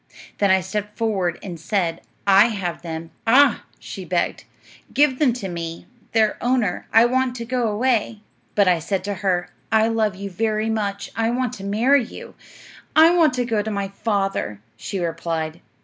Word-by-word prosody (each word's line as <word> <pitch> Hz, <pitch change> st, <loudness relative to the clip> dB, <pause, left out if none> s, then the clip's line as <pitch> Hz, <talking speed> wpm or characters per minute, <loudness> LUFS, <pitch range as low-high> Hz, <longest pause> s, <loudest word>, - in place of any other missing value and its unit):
Then 200 Hz, -, +3 dB
I 190 Hz, 0 st, +4 dB
stepped 210 Hz, +3 st, -5 dB
forward 195 Hz, -7 st, 0 dB
and 175 Hz, -4 st, -7 dB
said, 170 Hz, -1 st, -1 dB, 0.2 s
"I 200 Hz, +1 st, +7 dB
have 190 Hz, -7 st, -4 dB
them." 165 Hz, -1 st, -6 dB, 0.2 s
"Ah," 275 Hz, +5 st, +5 dB
she -, -, -8 dB
begged, -, -, -1 dB, 0.5 s
"give 280 Hz, -3 st, +3 dB
them 290 Hz, -5 st, +4 dB
to 230 Hz, -5 st, -5 dB
me, 170 Hz, -2 st, -6 dB, 0.3 s
their 220 Hz, -2 st, +2 dB
owner; 240 Hz, -7 st, 0 dB
I 225 Hz, +1 st, +6 dB
want 255 Hz, 0 st, +1 dB
to 235 Hz, -2 st, -5 dB
go 245 Hz, -1 st, 0 dB
away." 220 Hz, -1 st, 0 dB, 0.3 s
But 200 Hz, -2 st, +4 dB
I 180 Hz, -2 st, +4 dB
said 185 Hz, +4 st, -2 dB
to 205 Hz, +1 st, -2 dB
her, 180 Hz, -3 st, 0 dB, 0.2 s
"I 220 Hz, 0 st, +4 dB
love 220 Hz, -3 st, 0 dB
you 200 Hz, +1 st, -6 dB
very 215 Hz, +3 st, 0 dB
much. 200 Hz, -2 st, -3 dB
I 225 Hz, 0 st, +1 dB
want 250 Hz, 0 st, -1 dB
to 195 Hz, -, -8 dB
marry 240 Hz, +7 st, +3 dB
you." -, -, -10 dB, 0.6 s
"I 325 Hz, +2 st, +7 dB
want 315 Hz, -6 st, +4 dB
to 250 Hz, -1 st, 0 dB
go 225 Hz, -3 st, 0 dB
to 215 Hz, -, -4 dB
my 200 Hz, -2 st, -2 dB
father," 195 Hz, -, -2 dB, 0.2 s
she 200 Hz, -, -5 dB
replied. 165 Hz, -2 st, -3 dB
210 Hz, 180 wpm, -22 LUFS, 190-235 Hz, 0.6 s, I